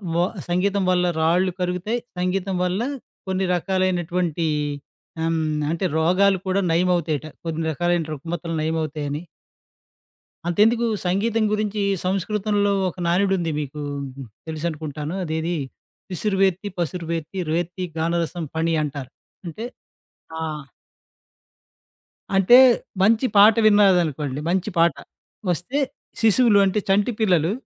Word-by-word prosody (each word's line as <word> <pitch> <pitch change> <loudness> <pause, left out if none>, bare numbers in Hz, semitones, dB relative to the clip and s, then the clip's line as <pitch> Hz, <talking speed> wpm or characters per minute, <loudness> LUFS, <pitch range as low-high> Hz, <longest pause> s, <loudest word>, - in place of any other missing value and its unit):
వ 170 - +3 0.3
సంగీతం 195 +3 +1
వల్ల 180 0 +2 0.2
రాళ్ళు 180 +4 +2
కరుగుతాయి, 180 +6 -1 0.2
సంగీతం 185 +1 -1
వల్ల 180 +2 0 0.5
కొన్ని 190 0 0
రకాలైనటువంటి 175 -2 0 0.8
ఆహ్, 165 - +1
హ్మ్. 160 - 0 0.3
అంటే 170 +3 -1
రోగాలు 185 +4 +3
కూడా 190 +1 +1
నయమవుతాయట. 165 -3 +1 0.2
కొన్ని 165 0 -2
రకాలైన 175 +1 0
రుగ్మతలు 165 +3 -5
నయమవుతాయని 155 -2 -2 1.3
అంతెందుకు 225 +7 +3 0.2
సంగీతం 215 +5 +1
గురించి 210 -1 -1 0.2
సంస్కృతంలో 205 +2 0 0.2
ఒక 180 - -11
నానుడు 190 +3 +2
ఉంది 170 -2 -1
మీకు 150 0 -5 0.7
తెలుసనుకుంటాను, 155 -1 -4
అదేది 160 +1 -2 0.6
శిసురువేత్తి 195 0 0
పసురువేత్తి 170 +1 -3
రేత్తి 175 +3 -2
గానరసం 170 +1 -1
ఫణి 165 +1 0
అంటారు 140 -3 -5 0.4
అంటే 215 +8 -6 0.7
ఆహ్ 155 -3 -4 1.7
అంటే 195 +6 +7 0.5
మంచి 225 +5 +4
పాట 210 +2 +8
విన్నారనుకోండి, 175 -10 +3
మంచి 185 +3 0
పాట 165 -2 +4 0.6
వస్తే 180 - -2 0.4
శిశువులు 225 -1 +5
అంటే, 195 +2 +1
చంటి 205 +4 +3
పిల్లలు 180 -6 +2
180 Hz, 105 wpm, -23 LUFS, 160-195 Hz, 1.7 s, పాట